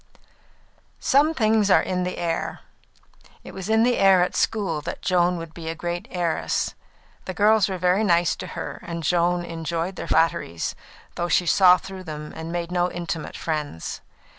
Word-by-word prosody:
Some 300 Hz, +4 st, +3 dB
things 215 Hz, -4 st, +3 dB
are 185 Hz, -, +5 dB
in 180 Hz, -1 st, -1 dB
the 180 Hz, -, -4 dB
air. 165 Hz, -1 st, -2 dB, 0.8 s
It -, -, -10 dB
was 190 Hz, +1 st, -6 dB
in 220 Hz, +1 st, +4 dB
the 245 Hz, 0 st, +2 dB
air 190 Hz, -2 st, +6 dB
at 180 Hz, -, -2 dB
school 195 Hz, -9 st, 0 dB
that -, -, -6 dB
Joan 180 Hz, -1 st, +2 dB
would 165 Hz, -1 st, -8 dB
be 165 Hz, -1 st, -6 dB
a 165 Hz, -, -3 dB
great 175 Hz, +1 st, -4 dB
heiress. 175 Hz, -3 st, -1 dB, 0.5 s
The 185 Hz, -, -5 dB
girls 210 Hz, -1 st, +4 dB
were 190 Hz, -, -3 dB
very 180 Hz, +4 st, +2 dB
nice 175 Hz, -4 st, +3 dB
to -, -, -6 dB
her, -, -, -5 dB
and 170 Hz, -1 st, -6 dB
Joan 175 Hz, +2 st, +1 dB
enjoyed 165 Hz, +2 st, -3 dB
their -, -, -5 dB
flatteries, 155 Hz, -, +1 dB, 0.4 s
though 175 Hz, -, -2 dB
she 180 Hz, -, +3 dB
saw 180 Hz, +1 st, +6 dB
through 190 Hz, 0 st, -9 dB
them 150 Hz, -1 st, -7 dB
and 160 Hz, +1 st, -6 dB
made 170 Hz, 0 st, -3 dB
no 180 Hz, 0 st, +1 dB
intimate 170 Hz, -2 st, -5 dB
friends. 150 Hz, -, -4 dB
175 Hz, 175 wpm, -24 LUFS, 165-190 Hz, 0.8 s, air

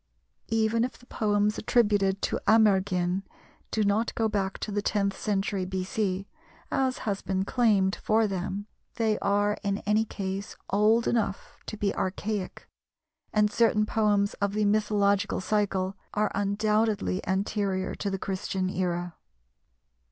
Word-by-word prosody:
Even 225 Hz, +1 st, +2 dB
if 250 Hz, -, -3 dB
the 245 Hz, -, -19 dB
poems 210 Hz, -3 st, 0 dB
attributed 205 Hz, -4 st, +2 dB
to -, -, 0 dB
Amergin 190 Hz, -4 st, +3 dB, 0.5 s
do 220 Hz, -, 0 dB
not 210 Hz, +3 st, +1 dB
go 225 Hz, -, +1 dB
back 195 Hz, -3 st, -1 dB
to 215 Hz, -, -5 dB
the 205 Hz, 0 st, 0 dB
tenth 200 Hz, -1 st, 0 dB
century 195 Hz, -2 st, -1 dB
B.C., 190 Hz, +1 st, -2 dB, 0.4 s
as 260 Hz, -1 st, +1 dB
has 200 Hz, -2 st, -1 dB
been 190 Hz, 0 st, -1 dB
claimed 205 Hz, -5 st, +2 dB
for 220 Hz, +1 st, +2 dB
them, 195 Hz, 0 st, -3 dB, 0.3 s
they 220 Hz, -2 st, +1 dB
are 205 Hz, +1 st, +1 dB
in 200 Hz, -1 st, -1 dB
any 210 Hz, +1 st, +3 dB
case 195 Hz, -2 st, -5 dB, 0.2 s
old 215 Hz, +3 st, +3 dB
enough 215 Hz, -4 st, -1 dB
to 215 Hz, -, -5 dB
be 205 Hz, -1 st, 0 dB
archaic, 200 Hz, +1 st, -3 dB, 0.6 s
and 210 Hz, -1 st, +3 dB
certain 215 Hz, -2 st, +3 dB
poems 205 Hz, -2 st, +2 dB
of 200 Hz, 0 st, +1 dB
the 210 Hz, 0 st, +1 dB
mythological 205 Hz, -1 st, +2 dB
cycle 195 Hz, -1 st, 0 dB, 0.2 s
are 210 Hz, 0 st, +1 dB
undoubtedly 210 Hz, 0 st, +1 dB
anterior 190 Hz, 0 st, -1 dB
to 200 Hz, -, -3 dB
the 195 Hz, -, -2 dB
Christian 190 Hz, -1 st, -2 dB
era. 175 Hz, -2 st, -2 dB
205 Hz, 135 wpm, -27 LUFS, 195-215 Hz, 0.6 s, Amergin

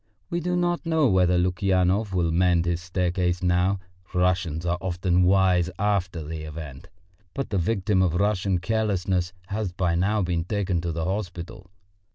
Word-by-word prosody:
We 170 Hz, -, 0 dB
do 180 Hz, +1 st, -1 dB
not 175 Hz, -1 st, 0 dB
know 160 Hz, -3 st, +2 dB
whether 90 Hz, -2 st, +3 dB
Lukyanov 95 Hz, +3 st, +1 dB
will 85 Hz, -3 st, +1 dB
mend 85 Hz, 0 st, +3 dB
his 85 Hz, 0 st, -1 dB
staircase 90 Hz, 0 st, -1 dB
now, 90 Hz, +2 st, +2 dB, 0.4 s
Russians 90 Hz, -3 st, +1 dB
are 90 Hz, 0 st, 0 dB
often 90 Hz, 0 st, +1 dB
wise 90 Hz, -1 st, +3 dB
after 95 Hz, -5 st, 0 dB
the 80 Hz, +1 st, -6 dB
event, 75 Hz, -3 st, -8 dB, 0.5 s
but 135 Hz, -5 st, -3 dB
the 100 Hz, -, +1 dB
victim 95 Hz, 0 st, +1 dB
of 90 Hz, -3 st, +2 dB
Russian 100 Hz, -1 st, +1 dB
carelessness 95 Hz, -3 st, 0 dB, 0.2 s
has 100 Hz, -2 st, -2 dB
by 90 Hz, -1 st, 0 dB
now 100 Hz, +4 st, +1 dB
been 85 Hz, -2 st, -1 dB
taken 95 Hz, -2 st, -1 dB
to 85 Hz, -1 st, -2 dB
the 80 Hz, 0 st, -3 dB
hospital. 90 Hz, -2 st, -5 dB
90 Hz, 160 wpm, -25 LUFS, 85-100 Hz, 0.5 s, whether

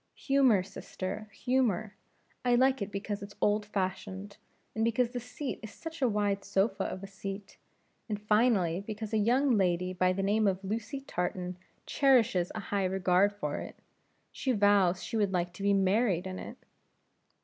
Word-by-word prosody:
"Humor, 265 Hz, -9 st, +3 dB
sister, 195 Hz, +2 st, -6 dB
humor; 220 Hz, -4 st, 0 dB, 0.5 s
I 245 Hz, -1 st, +3 dB
like 260 Hz, 0 st, +3 dB
it 200 Hz, 0 st, -3 dB
because 205 Hz, +1 st, -4 dB
it's 200 Hz, 0 st, -9 dB
old 210 Hz, 0 st, +1 dB
fashioned, 195 Hz, 0 st, -4 dB, 0.4 s
and 220 Hz, -, -1 dB
because 230 Hz, +1 st, +1 dB
the 245 Hz, -, -3 dB
seat 250 Hz, +4 st, -5 dB
is 220 Hz, -, -7 dB
such 325 Hz, -1 st, -9 dB
a 255 Hz, -, +4 dB
wide 205 Hz, -2 st, 0 dB
sofa 200 Hz, +2 st, 0 dB
of 185 Hz, -, -5 dB
a -, -, -6 dB
seat, 195 Hz, 0 st, -7 dB, 0.5 s
and 210 Hz, -1 st, -2 dB
finally 210 Hz, -5 st, +2 dB
because 215 Hz, +1 st, -6 dB
a 220 Hz, -, +3 dB
young 255 Hz, +6 st, +3 dB
lady 180 Hz, -1 st, +1 dB
by 185 Hz, 0 st, +2 dB
the 195 Hz, +1 st, -1 dB
name 210 Hz, +2 st, +2 dB
of 190 Hz, 0 st, 0 dB
Lucy 225 Hz, +7 st, -3 dB
Tartan 180 Hz, -5 st, -3 dB, 0.3 s
cherishes 235 Hz, -10 st, +3 dB
a -, -, -2 dB
high 200 Hz, -1 st, +2 dB
regard 185 Hz, +1 st, +3 dB
for 150 Hz, -8 st, -4 dB
it. -, -, -8 dB, 0.6 s
She 260 Hz, -, -1 dB
vows 200 Hz, -4 st, +3 dB
she 225 Hz, -, -3 dB
would 205 Hz, -3 st, +2 dB
like 175 Hz, -1 st, -1 dB
to -, -, -10 dB
be 200 Hz, 0 st, +3 dB
married 195 Hz, -1 st, +2 dB
in 185 Hz, 0 st, -5 dB
it." -, -, -8 dB
205 Hz, 170 wpm, -30 LUFS, 190-225 Hz, 0.6 s, a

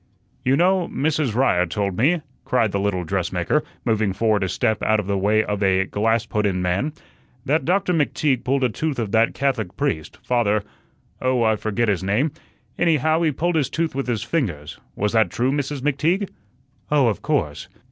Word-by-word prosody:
"You 130 Hz, +2 st, +3 dB
know, 180 Hz, +1 st, +3 dB
Mrs. 150 Hz, -5 st, -1 dB
Ryer 105 Hz, -9 st, +3 dB
told 100 Hz, +2 st, -2 dB
me," 155 Hz, -, +2 dB, 0.2 s
cried 115 Hz, -5 st, +1 dB
the 100 Hz, -, -1 dB
little 100 Hz, -3 st, -1 dB
dressmaker, 90 Hz, -, 0 dB, 0.2 s
moving 110 Hz, -4 st, +1 dB
forward 105 Hz, 0 st, +1 dB
a 95 Hz, -, -1 dB
step 110 Hz, 0 st, 0 dB
out 110 Hz, 0 st, +2 dB
of 105 Hz, -, -3 dB
the 100 Hz, +1 st, -1 dB
way 105 Hz, +3 st, +2 dB
of 105 Hz, -1 st, -3 dB
a 95 Hz, -1 st, +3 dB
"glass 110 Hz, +3 st, 0 dB
put 105 Hz, -1 st, 0 dB
in" 90 Hz, -2 st, -1 dB
man, 90 Hz, +12 st, -1 dB, 0.5 s
"that 150 Hz, +4 st, +1 dB
Doctor 180 Hz, +1 st, +1 dB
McTeague 145 Hz, -4 st, +1 dB
pulled 135 Hz, +1 st, +1 dB
a 125 Hz, -, +3 dB
tooth 150 Hz, +4 st, -3 dB
of 110 Hz, -4 st, -2 dB
that 115 Hz, +1 st, +3 dB
Catholic 125 Hz, -9 st, -1 dB
priest, 135 Hz, -, -2 dB
Father 105 Hz, -4 st, +1 dB, 0.6 s
oh, 130 Hz, -2 st, +2 dB
I 110 Hz, -1 st, +3 dB
forget 110 Hz, +2 st, -1 dB
his 100 Hz, -4 st, +1 dB
name 110 Hz, +11 st, +1 dB, 0.5 s
anyhow, 160 Hz, -1 st, +2 dB
he 160 Hz, -2 st, +2 dB
pulled 170 Hz, +5 st, -1 dB
his 145 Hz, -4 st, +1 dB
tooth 165 Hz, +2 st, -1 dB
with 135 Hz, 0 st, -3 dB
his 115 Hz, -4 st, -1 dB
fingers. 90 Hz, -, -3 dB, 0.2 s
Was 105 Hz, +1 st, -1 dB
that 110 Hz, -1 st, +3 dB
true, 125 Hz, +2 st, 0 dB
Mrs. 145 Hz, -1 st, -2 dB
McTeague?" 155 Hz, +8 st, 0 dB, 0.6 s
"Oh, 145 Hz, -3 st, +4 dB
of 110 Hz, -3 st, 0 dB
course. 100 Hz, -, -1 dB
115 Hz, 190 wpm, -22 LUFS, 100-145 Hz, 0.6 s, Oh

